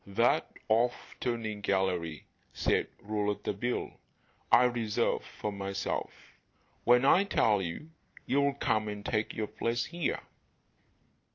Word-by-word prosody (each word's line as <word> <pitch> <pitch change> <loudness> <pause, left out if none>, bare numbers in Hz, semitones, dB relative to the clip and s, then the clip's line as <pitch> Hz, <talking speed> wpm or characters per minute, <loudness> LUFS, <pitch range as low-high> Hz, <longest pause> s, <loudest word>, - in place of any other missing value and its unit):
"That 115 +5 +2 0.2
'off 120 +3 +1
turning' 110 -4 -2
gallery," 95 -5 0 0.3
said - - +1 0.2
Rouletabille, 105 +2 -2 0.5
"I 125 - +8
reserve 120 -4 +1
for 105 - -5
myself; 100 -1 -3 0.7
when 125 +2 +6
I 180 +7 +6
tell 110 - +2
you 95 - -5 0.3
you'll 140 0 +2
come 110 -1 +1
and 105 -1 -5
take 110 -1 -1
your 110 - -1
place 115 +2 -1
here." 170 -1 -2
110 Hz, 110 wpm, -31 LUFS, 100-120 Hz, 0.7 s, I